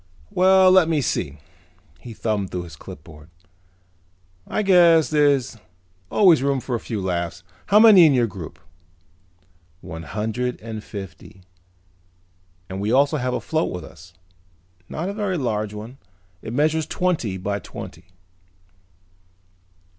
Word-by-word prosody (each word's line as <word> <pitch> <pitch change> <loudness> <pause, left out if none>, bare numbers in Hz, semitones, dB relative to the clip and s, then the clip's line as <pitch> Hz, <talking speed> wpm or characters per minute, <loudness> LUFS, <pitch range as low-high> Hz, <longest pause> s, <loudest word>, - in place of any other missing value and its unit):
Well, 190 0 +5
let 185 -3 +5
me 160 -2 +1
see," 75 - -2 0.6
he 115 +5 -10
thumbed 105 -2 -2
through 90 -1 -4
the - - -13
clipboard, 75 +2 -13 1.2
"I 215 - -1
guess 170 -5 +5
there's 140 -5 +2 0.5
always 180 -9 +5
room 140 0 0
for 125 - -6
a 120 - 0
few 110 -1 -5
laughs. 85 -2 -3 0.2
How 210 +1 +5
many 210 -7 +8
in 145 - +3
your 120 -2 +3
group?" 95 -7 -9 1.2
"One 80 +1 -8
hundred 110 +7 -3
and 110 -1 -7
fifty. 95 -2 -10 1.2
And 95 +1 -6
we 105 +2 -1
also 140 +4 +3
have 125 -2 -2
a - - -1
float 160 0 -2
with 90 - -6
us. 85 +2 -15 0.7
Not 165 +4 -4
a 200 - -3
very 200 -3 -2
large 110 -6 -2
one. 110 +6 -9 0.4
It - - -7
measures 155 +4 +1
twenty 160 - -1
by 100 +2 -3
twenty." 85 -2 -10
125 Hz, 135 wpm, -22 LUFS, 95-160 Hz, 1.2 s, many